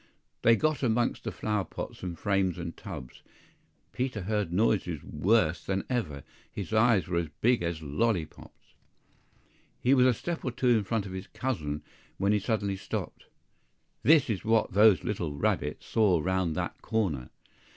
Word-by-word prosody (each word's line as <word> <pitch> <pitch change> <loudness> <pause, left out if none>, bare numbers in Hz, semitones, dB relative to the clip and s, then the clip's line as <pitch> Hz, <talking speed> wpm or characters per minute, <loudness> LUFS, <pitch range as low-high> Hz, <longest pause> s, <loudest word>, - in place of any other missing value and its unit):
THEY 115 0 +6
got 155 +3 0
amongst 120 -2 0
flower 105 -2 -1
pots, - - -7
and 90 -2 -5
frames 95 -2 +1
and 85 -1 -5
tubs; 60 - -9 0.7
Peter 125 -4 -2
heard 105 -2 -1
noises 90 -5 +1
worse 90 -6 +1
than 95 0 -1
ever, 75 - -2 0.3
his 100 +1 -6
eyes 110 -6 +4
were 85 -1 0
as 85 - -2
big 120 -1 +3
as 85 -2 -3
lolly 85 +4 +1
pops! - - -18 1.1
He 125 - +3
was 130 -1 +5
a 125 - +4
step 170 +5 -4
or - - -1
two 125 +1 0
in 110 -4 +3
front 110 -1 -1
of 95 - -7
his 95 +1 -6
cousin, 80 - -3 0.3
when 100 +1 +2
he 105 - +3
suddenly 100 -2 -1
stopped. - - -5 0.7
THIS 150 -2 +5
is 110 -6 -2
what 110 -3 +2
those 105 -1 +6
little 85 -8 -2
rabbits 70 - -1
saw 100 -6 +3
round 95 -1 0
that - - -4
corner! 85 - -1
100 Hz, 160 wpm, -29 LUFS, 85-115 Hz, 1.1 s, THEY